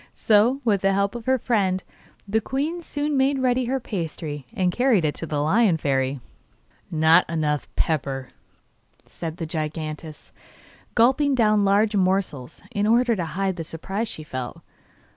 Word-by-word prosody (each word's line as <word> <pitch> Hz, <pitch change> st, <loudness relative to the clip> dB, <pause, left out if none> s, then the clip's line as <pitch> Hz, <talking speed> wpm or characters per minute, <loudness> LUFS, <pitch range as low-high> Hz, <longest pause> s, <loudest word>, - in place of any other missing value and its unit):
So, 230 Hz, +6 st, +3 dB
with 205 Hz, -4 st, +2 dB
the 195 Hz, 0 st, +2 dB
help 200 Hz, 0 st, +1 dB
of 240 Hz, -2 st, -7 dB
her 260 Hz, 0 st, +4 dB
friend, 195 Hz, -7 st, 0 dB, 0.4 s
the 220 Hz, +2 st, +1 dB
queen 295 Hz, +9 st, -2 dB
soon 295 Hz, -2 st, -2 dB
made 270 Hz, +1 st, +2 dB
ready 255 Hz, -1 st, +1 dB
her 265 Hz, +2 st, -1 dB
pasty 160 Hz, -, -5 dB
and 185 Hz, -6 st, 0 dB
carried 240 Hz, -6 st, +2 dB
it 150 Hz, -, +1 dB
to 165 Hz, -, -5 dB
the 150 Hz, -2 st, -2 dB
Lion 185 Hz, +4 st, +3 dB
Fairy. 135 Hz, -2 st, 0 dB, 0.7 s
'Not 160 Hz, +2 st, +4 dB
enough 150 Hz, -3 st, -1 dB
pepper,' 135 Hz, -5 st, -1 dB, 0.8 s
said 165 Hz, -1 st, -6 dB
the 165 Hz, -, -4 dB
giantess, 155 Hz, -1 st, -5 dB, 0.6 s
gulping 265 Hz, +4 st, +4 dB
down 215 Hz, -4 st, +3 dB
large 205 Hz, +2 st, +3 dB
morsels, 185 Hz, -9 st, -1 dB
in 205 Hz, 0 st, 0 dB
order 235 Hz, +2 st, +4 dB
the 180 Hz, -4 st, -2 dB
hide 195 Hz, -2 st, 0 dB
the 165 Hz, -, -3 dB
surprise 195 Hz, +8 st, -4 dB
she 155 Hz, -, -5 dB
felt. 130 Hz, -4 st, -6 dB
195 Hz, 155 wpm, -24 LUFS, 155-235 Hz, 0.8 s, her